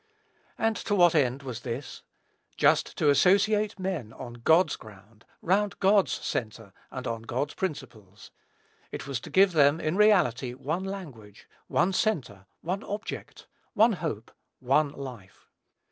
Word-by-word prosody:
And 225 0 +1
to 205 - -1
what 175 -3 +5
end 135 -3 +1
was 125 -4 -6
this? 120 +3 -6 0.6
Just - - +2
to 150 - +4
associate 205 +6 +3
men 180 - -4
on 120 -2 -9
God's 160 +10 +3
ground, 105 +1 -16 0.2
round 200 +3 +1
God's 195 0 +3
centre, 110 -3 -4 0.2
and 130 -1 -7
on 115 -2 -3
God's 130 +6 -3
principles. 115 - -7 0.6
It - - -6
was 140 -3 -3
to - - -11
give 195 0 +5
them, 145 -1 +4
in 155 +1 -1
reality, 140 - +3
one 155 +8 -3
language, 140 - -9 0.2
one 190 - +1
centre, 125 - -1
one 185 +4 -3
object, 210 +2 -7 0.3
one 225 +2 +5
hope, 150 - -5 0.3
one 140 +4 +2
life. 125 -9 -11
145 Hz, 140 wpm, -27 LUFS, 120-190 Hz, 0.6 s, what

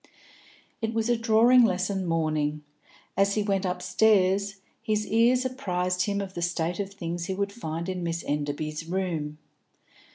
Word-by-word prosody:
It 225 0 -2
was 225 +1 0
a 240 - +4
drawing 230 +2 +5
lesson 190 -2 0
morning. 155 -2 0 0.5
As 200 +1 +2
he 210 - +1
went 195 -1 0
upstairs, 190 +2 +2 0.3
his 215 -2 0
ears 240 +3 +3
apprised 180 -8 -1
him 200 0 0
of 190 -1 -6
the 175 - -5
state 170 +1 -1
of 200 -1 -3
things 170 -3 -4
he 190 - -3
would 200 +1 -1
find 165 -6 -5
in 185 -1 -3
Miss 170 0 -2
Enderby's 150 +2 -3
room. 165 -5 -2
185 Hz, 155 wpm, -27 LUFS, 170-210 Hz, 0.5 s, drawing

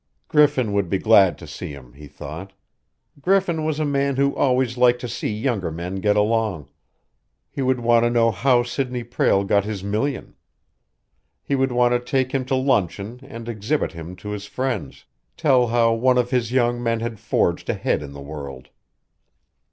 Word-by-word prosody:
Griffin 145 -8 +3
would 100 -3 0
be 95 - +1
glad 100 -3 +5
to 85 - -11
see 75 +2 -7
him, 65 -4 -13
he 75 +2 -12
thought. 75 +7 -9 0.7
Griffin 180 -2 +1
was 155 -1 -1
a 155 - +1
man 140 -1 0
who 140 +1 +1
always 130 -2 +1
liked 125 0 +4
to 125 - -5
see - - -3
younger 105 -4 -1
men 85 +4 -5
get 105 +2 +1
along. 105 - 0 0.8
He - - -4
would 130 -1 +1
want 120 0 +3
to - - +3
know 115 -1 +3
how 120 +4 +2
Sidney 125 0 -3
Prale 115 -4 +1
got 100 0 +2
his 105 -2 -5
million. 110 +7 -2 1.1
He - - -3
would 135 -1 +1
want 120 0 +3
to 120 - +2
take 130 +1 -1
him 135 -2 -1
to 130 - 0
luncheon 115 -3 0
and 115 -4 -10
exhibit 120 +6 -1
him 85 +1 -9
to 90 +3 -9
his 105 -1 -5
friends 120 - -4 0.3
tell 130 -4 +3
how 115 0 +3
one 125 +2 +2
of 125 0 +1
his 120 -3 0
young 120 -1 +1
men 115 -1 0
had 115 -2 -4
forged 90 -5 0
ahead - - 0
in 70 -1 -8
the 70 - -9
world. 70 -3 -8
115 Hz, 185 wpm, -22 LUFS, 100-130 Hz, 1.1 s, glad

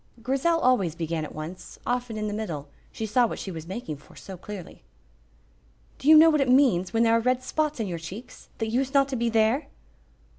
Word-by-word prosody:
Grizel 275 +7 +1
always 220 - +2
began 165 -1 -3
at 155 - -8
once, 170 +4 -8
often 245 -2 -2
in 215 0 -2
the 205 - -3
middle, 170 -10 -4 0.2
she 220 - -4
saw 235 +3 +3
what - - -5
she 195 - -6
was 165 -1 -8
making 185 -6 -5
for 145 - -19
so 190 - -9
clearly. 185 0 -9 1.2
"Do - - -5
you 315 - +10
know 325 +1 +8
what 305 -2 +2
it 265 - +1
means 245 -10 +4
when 225 +2 +2
there 230 0 +4
are - - +4
red 255 +2 0
spots 305 -2 -1
in 220 - -1
your 175 -3 -4
cheeks, 190 +10 -10
that 225 -1 -2
used 265 +3 -1
not 275 -1 +5
to 270 - -2
be 235 -1 0
there?" 225 +5 +2
225 Hz, 220 wpm, -26 LUFS, 180-255 Hz, 1.2 s, you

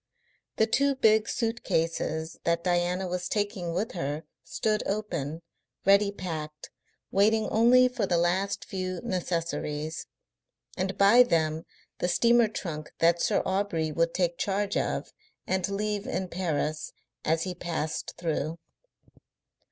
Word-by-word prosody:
The 220 - +4
two 275 +5 +2
big 220 -4 +4
suit 230 0 -2
cases 160 0 -1
that 170 0 +1
Diana 180 +1 +1
was 180 0 -3
taking 205 -4 -1
with 190 +6 -1
her 150 -2 -3 0.2
stood 215 -1 0
open, 170 -7 -3 0.4
ready 200 +1 +5
packed, 155 -6 -6 0.4
waiting 215 +2 +3
only 245 +3 +6
for 250 - -2
the 175 - +2
last 185 +4 0
few 185 -4 -3
necessaries, 165 -3 -3 0.7
and 190 +1 -2
by 200 +5 +7
them 160 -8 +1 0.3
the - - +1
steamer 235 +4 +4
trunk 155 -7 -5
that 170 +1 +3
Sir - - +2
Aubrey 190 -5 0
would 165 +2 0
take 175 -2 0
charge 200 0 0
of - - -2 0.3
and 190 0 0
leave 205 0 -2
in 185 +1 -2
Paris 155 -4 -2 0.3
as 160 +1 +1
he 185 - -3
passed 155 -7 -4
through. 160 -1 -2
180 Hz, 130 wpm, -28 LUFS, 165-205 Hz, 0.7 s, by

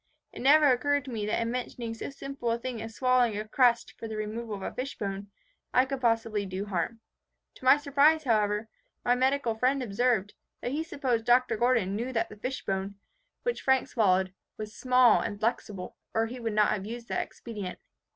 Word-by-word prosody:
It - - -8
never 295 +4 +6
occurred 285 +2 +1
to 265 - -7
me 215 -3 -3
that 210 - 0
in 230 0 -1
mentioning 240 -2 -4
so 225 - -6
simple 275 -3 -5
a 230 - +1
thing 235 -1 -5
as 225 0 -7
swallowing 255 -4 +3
a 215 +1 -4
crust 235 0 +3
for 225 - -5
the 220 -1 -5
removal 215 +1 -4
of 195 - -8
a - - -4
fish 265 +2 -5
bone, 200 -1 -4 0.5
I 255 - +6
could 270 -1 -4
possibly 225 -3 +1
do 190 +2 -4
harm. 205 +4 -3 0.6
To - - -13
my 260 - +8
surprise, 290 +2 +3
however, 210 -3 +1 0.4
my 245 - +4
medical 260 -1 +1
friend 255 +4 +1
observed, 220 -2 +1 0.3
that 245 - -3
he 295 +3 -1
supposed 260 -8 -1
Dr. 245 -1 +4
Gordon 230 -4 +2
knew 240 +4 -3
that 230 -1 0
the - - -10
fishbone, 200 -5 -3 0.5
which 485 -1 -1
Frank 265 -1 +2
swallowed, 190 -4 +2 0.2
was 215 0 -7
small 255 -2 +5
and 205 - -4
flexible, 210 -4 -2 0.2
or 225 0 +3
he 245 +3 -7
would 225 -2 -2
not 210 0 +4
have 200 -1 -2
used 235 +1 -7
that - - 0
expedient. 205 -6 -7
235 Hz, 200 wpm, -29 LUFS, 210-255 Hz, 0.6 s, my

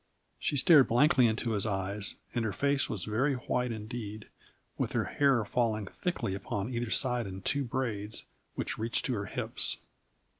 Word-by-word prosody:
She 145 - 0
stared 145 -1 +7
blankly 130 0 +5
into 115 +1 -1
his 105 0 +2
eyes, 100 0 -1 0.2
and 120 - 0
her 110 - 0
face 140 +7 +1
was 100 -5 -3
very 125 +7 +1
white 125 0 -1
indeed, 110 -1 -6 0.5
with - - -2
her - - +2
hair 135 -6 +2
falling 110 -2 0
thickly 170 - -3
upon 100 +4 -3
either 120 -1 -2
side 125 -2 +1
in 95 0 -7
two 140 +6 +1
braids 115 -5 -3 0.3
which - - -3
reached 115 +1 0
to 130 - 0
her 105 -3 -2
hips. - - -1
115 Hz, 165 wpm, -31 LUFS, 105-130 Hz, 0.5 s, stared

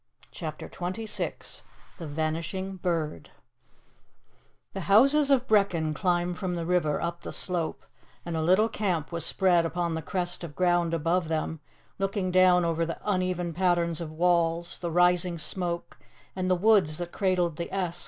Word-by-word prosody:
CHAPTER 155 -4 -6
XXVI 190 +5 -4 0.4
THE 165 - -6
VANISHING 165 +5 -3
BIRD 165 - -2 1.4
THE 195 - -4
houses 275 +8 +5
of 260 -2 +3
Brechin 180 -7 +2
climb 175 +1 0
from 180 -1 -3
the 170 -1 -3
river 170 -4 +1
up 170 0 -3
the - - -6
slope, 175 -3 -2 0.4
and 170 -1 -3
a 160 - 0
little 185 +7 +4
camp 185 -9 -2
was 170 -2 -1
spread 180 -3 +3
upon 170 0 -1
the 160 - -2
crest 175 +1 -3
of 150 -4 -7
ground 175 -2 +2
above 165 +2 0
them, 160 0 -2 0.4
looking 195 -1 -1
down 180 -1 +5
over 165 0 0
the 165 0 -3
uneven 185 -3 -1
pattern 175 -1 +2
of 165 -2 -5
walls, 170 0 +1
the 170 - -3
rising 180 +1 +3
smoke, 170 +1 -4 0.4
and 185 0 -1
the 185 - +4
woods 185 -5 +3
that 175 0 -5
cradled 180 -4 0
the 170 - -5
Esk. 180 -3 -2
175 Hz, 155 wpm, -27 LUFS, 165-185 Hz, 1.4 s, houses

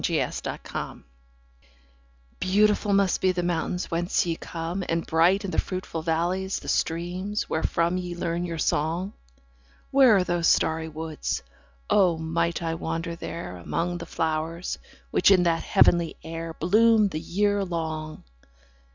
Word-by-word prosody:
Nightingales - - -1 2.0
BEAUTIFUL 205 +2 +2
must 195 -2 +2
be 185 - +4
the 175 -1 -1
mountains 175 +1 -2
whence 175 +2 +1
ye 170 -1 -1
come, 170 +3 -4
And 165 0 0
bright 175 +5 +3
in 190 - -3
the - - +1
fruitful 185 -3 -4
valleys 175 +4 0
the - - -9
streams, 180 +5 -1
wherefrom 170 +2 0
Ye 180 -1 -4
learn 170 0 -2
your 170 -2 -4
song: 165 +6 0 0.8
Where 265 -5 +6
are 190 - +3
those 175 -2 0
starry 160 0 +2
woods? 160 0 -4 0.4
O 185 -5 +4
might 170 +1 -1
I 165 0 -1
wander 165 +1 -3
there, 165 - -6
Among 175 - -2
the 170 - -7
flowers, 160 +2 -2 0.3
which - - +4
in 185 -3 +6
that 165 -1 +2
heavenly 170 -2 +3
air 165 0 -5
5 - - -29
Bloom 215 +4 +5
the 155 - -4
year 205 +4 +1
long! 160 -3 -4
170 Hz, 145 wpm, -26 LUFS, 165-185 Hz, 2.0 s, Where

